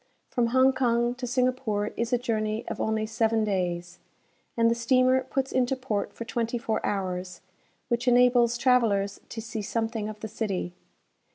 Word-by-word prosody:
From 240 Hz, -3 st, +1 dB
Hong 260 Hz, +2 st, +4 dB
Kong 240 Hz, -2 st, +1 dB
to 250 Hz, 0 st, -6 dB
Singapore 245 Hz, -4 st, 0 dB
is 235 Hz, +1 st, -2 dB
a 245 Hz, -, +4 dB
journey 220 Hz, -2 st, -2 dB
of -, -, -4 dB
only 220 Hz, 0 st, 0 dB
seven 225 Hz, 0 st, +1 dB
days, 175 Hz, -3 st, -2 dB, 0.6 s
and 230 Hz, 0 st, +4 dB
the 230 Hz, -, +4 dB
steamer 255 Hz, +2 st, +3 dB
puts 270 Hz, -1 st, -2 dB
into 255 Hz, 0 st, +1 dB
port 230 Hz, -6 st, -3 dB
for 230 Hz, -, -7 dB
twenty 235 Hz, 0 st, -2 dB
four 225 Hz, -1 st, -2 dB
hours, 185 Hz, -2 st, -3 dB, 0.5 s
which 240 Hz, +1 st, -1 dB
enables 245 Hz, -1 st, +4 dB
travellers 220 Hz, -6 st, +2 dB
to 225 Hz, -, -6 dB
see 220 Hz, 0 st, -5 dB
something 225 Hz, 0 st, -2 dB
of 215 Hz, 0 st, -8 dB
the 220 Hz, -, -4 dB
city. 195 Hz, -5 st, -3 dB
230 Hz, 165 wpm, -27 LUFS, 215-245 Hz, 0.6 s, Hong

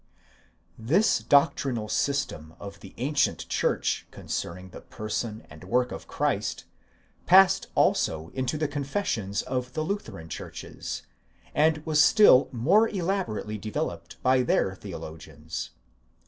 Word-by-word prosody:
This 165 Hz, -, +3 dB
doctrinal 140 Hz, -6 st, +2 dB
system 125 Hz, -, -2 dB
of 100 Hz, -1 st, -9 dB
the 95 Hz, -, -13 dB
ancient 140 Hz, +4 st, 0 dB
church -, -, 0 dB
concerning 90 Hz, +2 st, -5 dB
the -, -, -10 dB
person 110 Hz, +1 st, -5 dB
and 80 Hz, +2 st, -13 dB
work 125 Hz, +6 st, +1 dB
of -, -, -8 dB
Christ, -, -, -1 dB, 0.6 s
passed 190 Hz, +1 st, +6 dB
also 80 Hz, +1 st, +2 dB
into 130 Hz, +3 st, -2 dB
the 155 Hz, 0 st, 0 dB
confessions 140 Hz, -, -2 dB
of 125 Hz, -1 st, -3 dB
the 155 Hz, -, -1 dB
Lutheran 155 Hz, -, -5 dB
churches, -, -, -7 dB, 0.5 s
and 155 Hz, 0 st, +2 dB
was 155 Hz, -1 st, +4 dB
still 145 Hz, -, +6 dB
more 180 Hz, -, +3 dB
elaborately 175 Hz, -, -2 dB
developed 85 Hz, -5 st, -4 dB
by 130 Hz, 0 st, +4 dB
their 125 Hz, -, +1 dB
theologians. 80 Hz, 0 st, -7 dB
125 Hz, 120 wpm, -27 LUFS, 100-155 Hz, 0.6 s, passed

